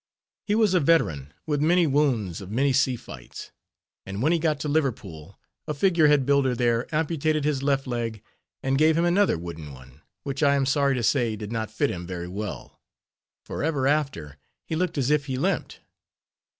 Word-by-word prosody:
He 205 - +2
was 215 -4 +3
a 180 - +4
veteran 80 - +1
with 145 -2 -1
many 170 +3 +4
wounds 130 - 0
of 95 - -9
many 135 +6 +1
sea 130 0 +2
fights; 70 - -10 0.5
and 95 +1 -6
when 155 - +3
he 170 - +2
got 155 -2 0
to - - -3
Liverpool 115 - -3 0.3
a 150 - -2
figure 170 0 +3
head 145 -3 +4
builder 140 -2 +2
there, 120 0 +1
amputated 155 -1 0
his 145 -2 0
left 135 -1 +1
leg, 115 -4 -4 0.4
and 135 +1 +1
gave 155 +1 +4
him 170 - +2
another 185 - +3
wooden 80 -3 -8
one, 65 +3 -15 0.2
which 140 0 -4
I 140 -2 +4
am 135 -1 +1
sorry 140 0 +2
to 120 - -2
say, 120 -2 +1
did 105 0 -7
not 110 -2 -3
fit 125 +6 0
him 90 -1 -6
very 90 -1 -5
well, 100 +3 -7 0.6
for - - -5
ever 145 -4 0
after 135 - -1 0.3
he 160 - -3
looked 175 -1 -1
as 135 0 +1
if 150 -1 +1
he 130 -1 -2
limped. - - -2
135 Hz, 190 wpm, -25 LUFS, 110-150 Hz, 0.6 s, a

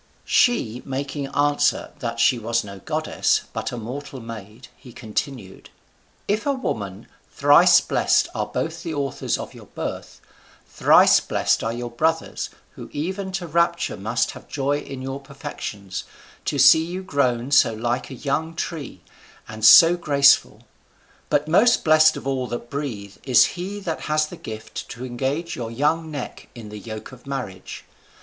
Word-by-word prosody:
She 125 - +2
making 140 +1 -4
answer 145 +1 +1
that 115 -1 -4
she 125 0 +4
was 115 +1 0
no 100 -1 -9
goddess, - - 0
but - - -3
a 120 - -5
mortal 130 +4 -7
maid, 115 0 -10
he 125 - -15
continued: 110 -2 -5 0.6
"If 210 +5 -1
a 280 - +3
woman, 100 - -4 0.3
thrice - - +6
blessed - - +2
are - - -2
both 165 +1 -3
the 165 -2 -4
authors 140 -2 -2
of - - -8
your - - -13
birth, - - -6 0.5
thrice - - +5
blessed - - 0
are 115 - -1
your 120 0 -5
brothers, 160 +6 -1 0.2
who - - -11
even 190 +6 -4
to 185 -1 -3
rapture 170 +1 0
must 110 +5 -1
have - - -13
joy 145 +1 -1
in 135 -2 -8
your 135 +1 -4
perfections, 135 -9 -7 0.4
to 145 - -1
see 160 +4 +7
you 180 +3 -5
grown 130 -7 0
so 145 - +5
like 120 +3 -2
a 135 - -7
young 155 +5 -2
tree, 150 - -5 0.5
and 110 0 -9
so 165 +10 +9
graceful. 140 -4 +3 0.7
But 150 - +1
most 210 +9 +4
blessed 155 0 +5
of - - -9
all 130 -2 -1
that 120 0 -6
breathe 115 -9 -5
is 130 -3 +6
he 190 +3 -5
that 165 -4 -4
has 155 0 +1
the - - -9
gift 110 0 -8
to 120 +2 -7
engage 135 +7 -3
your 115 -2 -5
young 150 +7 0
neck 145 -4 -7
in 115 -3 -9
the 105 0 -8
yoke 110 +2 -8
of 125 0 -15
marriage. 125 -9 -6
135 Hz, 160 wpm, -23 LUFS, 115-155 Hz, 0.7 s, so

